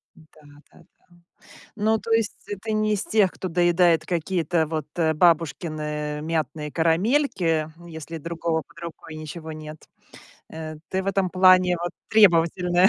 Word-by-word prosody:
Да-да-да. 150 -2 -21 0.7
Ну, 220 +1 +2
то 230 - -9
есть 225 -2 +1 0.3
ты 220 -1 -3
не 215 0 +1
из 195 - -2
тех, 210 -4 +3
кто 185 - -5
доедает 175 -1 +3
какие-то 170 -2 0
вот, 155 -2 -4
э, 160 -2 +2
бабушкины 155 -2 0
мятные 155 -1 -3
карамельки, 165 - +1 0.2
если 160 0 -7
другого 165 0 -2
под 155 +3 -20
рукой 160 -1 -9
ничего 155 +1 -7
нет. 155 0 -8 0.7
Э, 155 -1 -7
ты 190 0 -1
в - - -9
этом 195 -2 0
плане 185 -1 +5
вот 175 0 -3 0.2
требовательная. 180 -2 +4
170 Hz, 135 wpm, -24 LUFS, 155-185 Hz, 0.7 s, плане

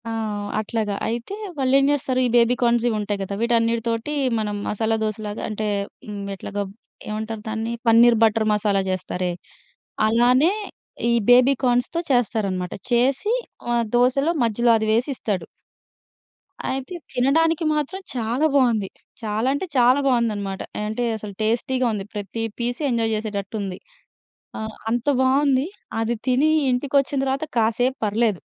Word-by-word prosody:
ఆ! - - -3 0.5
అట్లాగా. 215 -1 -2
అయితే, 235 - -3 0.2
వాళ్ళేం 270 0 +3
జేస్తారు, 265 -3 0
ఈ - - -2
బేబీ 240 +1 +5
కార్న్‌సివుంటాయి 225 -4 +1
గదా! 195 +1 -4
వీటన్నిటితోటి 230 +2 0 0.3
మనం 210 -1 -2
మసాలా 220 +1 0
దోసలాగా 215 0 -4
అంటే, 215 0 -3 0.4
"హ్మ్, 205 -1 -5
ఎట్లాగ, 200 +1 -8 0.5
ఏవంటారు 215 0 -4
దాన్ని?" 225 +1 -2 0.2
పన్నీర్ 230 +1 +6
బటర్ 220 0 +3
మసాలా 205 -1 +1
చేస్తారే, 185 -1 -2 0.8
అలానే 250 - +4 0.6
ఈ - - +3 0.2
బేబీ 250 +2 +6
కార్న్స్‌తో 245 +7 +1
చేస్తారనమాట. 200 -7 0 0.2
చేసి 265 - +2 0.4
ఆహ్, 235 -1 +2
దోసలో 260 +6 +3
మధ్యలో 235 +2 +2
అది 220 - -1
వేసిస్తాడు. 225 - -1 1.2
అయితే 270 +7 -4 0.2
తినడానికి 315 +6 +2
మాత్రం 300 +6 -2
చాలా 240 +5 0
బావుంది. 230 -7 +3 0.3
చాలా 220 +2 -1
అంటే 285 +7 -2
చాలా 250 +2 +5
బావుందనమాట. 210 -6 0 0.2
ఆహ్, - - -2
అంటే, 220 +3 -2
అసలు 210 -1 -8
టేస్టీగా 245 +4 0
ఉంది. 200 -2 -4
ప్రతీ 210 +2 -4 0.2
పీస్ 240 +1 -2
ఎంజాయ్ 225 -2 +1
చేసేటట్టుంది. 200 -2 -4 0.8
ఆహ్, 220 0 -5 0.2
అంత 240 +3 -1
బావుంది. 265 +1 +3 0.3
అది 225 +1 0
తినీ 260 +4 +3 0.2
ఇంటికొచ్చిన 275 +2 +1
తర్వాత 270 +3 -1
కాసేపు 235 +4 +1
పర్లేదు. 210 -2 +1
230 Hz, 125 wpm, -23 LUFS, 215-255 Hz, 1.2 s, పన్నీర్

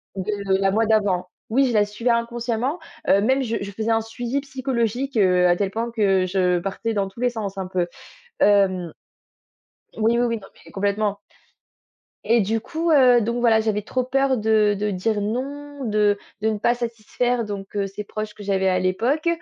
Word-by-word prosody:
de, 195 +2 -3 0.2
heu, - - +3
la 195 0 +2
moi 220 +2 +2
d'avant. 200 -5 +1 0.2
Oui, 270 +3 +4
je 240 - -1
la 210 -1 +4
suivais 210 +4 -3
inconsciemment, 235 +5 -1 0.3
heu, 200 - +5
même 265 +5 +2
je 230 -2 -2
je 200 - -4
faisais 220 +3 -2
un 225 0 +2
suivi 240 +4 -3
psychologique, 260 -1 -2
heu, 180 -3 +4
à 175 0 +4
tel 200 +1 -1
point 230 +4 -3
que, 195 -5 +2
heu, - - 0
je, 185 +1 -2 0.2
heu, - - -3
partais 210 +4 -3
dans 200 -1 0
tous 195 - -15
les 250 0 +2
sens 205 -5 -5
un 190 - -3
peu. 180 -1 -1 0.5
Hem, 190 -4 +3 1.1
oui, 225 +2 +2
oui, 245 - +3
oui. 230 -1 0
Non 195 -3 -12 0.2
mais - - -14
complètement. 200 +1 -1 1.0
Et 235 0 +3
du 220 +3 0
coup, 325 +7 -2
heu, 255 -5 +6
donc 235 +2 -1
voilà, 230 -2 +4
j'avais 215 -1 0
trop 255 +5 -2
peur 270 +1 +1
de 215 -1 +3
de 210 0 0
dire 205 +3 -1
non, 280 +6 -4
de 210 -2 +2 0.2
de 220 - +2
ne 215 -1 -2
pas 240 +3 +2
satisfaire 235 +1 -2
donc 200 -2 -7
heu, 200 -1 0
ces 195 +2 -7
proches 215 0 -6
que 210 - -10
j'avais 190 -1 +1
à 185 - +2
l'époque. 235 - 0
220 Hz, 205 wpm, -23 LUFS, 200-240 Hz, 1.1 s, heu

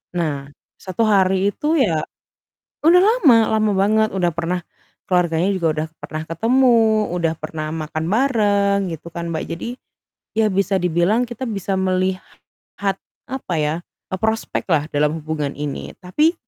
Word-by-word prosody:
Nah, 145 -5 -2 0.3
satu 190 +4 -1
hari 195 -1 +3
itu 315 +2 0
ya 170 - +2 0.8
udah 350 +3 +6
lama, 385 - +5
lama 215 -1 +2
banget, 215 +2 +3
udah 180 -3 0
pernah 170 +2 -1 0.5
keluarganya 175 -1 +2
juga 170 -3 -1
udah 155 +1 -2 0.2
pernah 155 0 -5
ketemu, 225 +1 +3
udah 165 -2 0
pernah 155 0 -5
makan 155 0 -4
bareng 205 -5 +2
gitu 165 +1 -8
kan, 170 0 -4
Mbak. 160 -1 -2
Jadi, 175 - -6 0.7
ya, 220 -1 +2
bisa 195 -1 +1
dibilang 180 +7 +2
kita 245 +1 -5
bisa 195 -3 -2
melihat 190 +1 -3 0.3
apa 260 -9 -4
ya, 150 0 +1 0.4
e - - -2
prospeklah 180 -8 0
dalam 150 +1 +1
hubungan 150 -2 -3
ini, 145 -1 -5
tapi 300 - +2
190 Hz, 140 wpm, -20 LUFS, 165-220 Hz, 0.8 s, udah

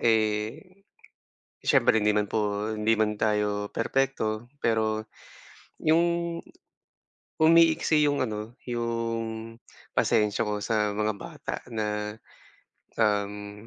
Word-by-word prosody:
eh, 110 - 0 0.8
siyempre 110 - +4
hindi 105 - +3
naman 105 - +2
po 105 0 0
hindi 110 +1 +1
man 105 -1 +2
tayo 105 -1 +1
perpekto 120 -3 -1
pero 110 -3 0 0.8
yung, 170 +1 +2 1.1
umiiksi 160 -2 +5
yung 145 -2 +1
ano, 110 0 -5
yung 115 -1 -3 0.3
pasensya 105 +1 +2
ko 105 -1 -2
sa 105 -1 0
mga 105 0 +1
bata - - -6
na, 105 -2 -3 0.8
um 105 -1 -1
110 Hz, 95 wpm, -27 LUFS, 105-120 Hz, 1.1 s, umiiksi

